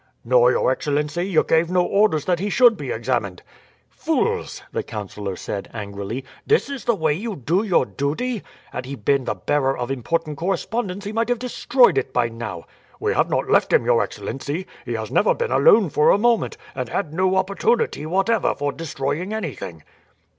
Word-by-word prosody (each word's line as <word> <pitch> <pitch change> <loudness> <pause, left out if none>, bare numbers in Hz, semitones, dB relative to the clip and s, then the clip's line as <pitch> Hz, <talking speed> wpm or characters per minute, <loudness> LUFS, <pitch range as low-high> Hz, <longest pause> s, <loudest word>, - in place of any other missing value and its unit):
"No, 125 0 +5
your 130 - +2
excellency. 150 +3 -1
You 180 -5 +3
gave 165 +1 +2
no 180 0 +3
orders 195 -8 +2
that 175 -2 +1
he 205 +3 -1
should 240 +1 +5
be 145 -8 -6
examined." 110 -6 -2 0.5
"Fools!" - - -1
the - - -1
councillor 100 -2 -6
said 100 +2 -5
angrily; 105 +4 -5 0.2
"this 430 -9 +2
is 275 -3 -6
the 235 - +3
way 160 -5 +1
you 210 +6 -4
do 165 +7 0
your 190 -11 +2
duty. 185 - -2 0.3
Had 125 0 -5
he 140 - -5
been 135 +3 +1
the 115 - -1
bearer 135 +8 0
of 125 +1 -3
important 150 +3 -2
correspondence 195 +2 -2
he 205 - -3
might 230 +2 -1
have 245 - +2
destroyed 250 +1 +3
it 130 - -6
by 120 -1 +2
now." 115 -7 -6 0.4
"We - - 0
have - - +2
not - - 0
left - - +3
him, - - +4
your 120 -1 +4
excellency. 140 - -4 0.2
He - - -3
has - - -4
never - - +3
been 480 0 -2
alone 220 - +5
for 150 - +4
a - - +6
moment, 235 +1 +1 0.2
and 125 -3 -4
had 155 -6 -2
no 185 +2 +2
opportunity 190 -3 0
whatever 195 +7 +1
for 145 0 -1
destroying 160 +5 -3
anything." 100 - -6
155 Hz, 185 wpm, -22 LUFS, 125-200 Hz, 0.5 s, a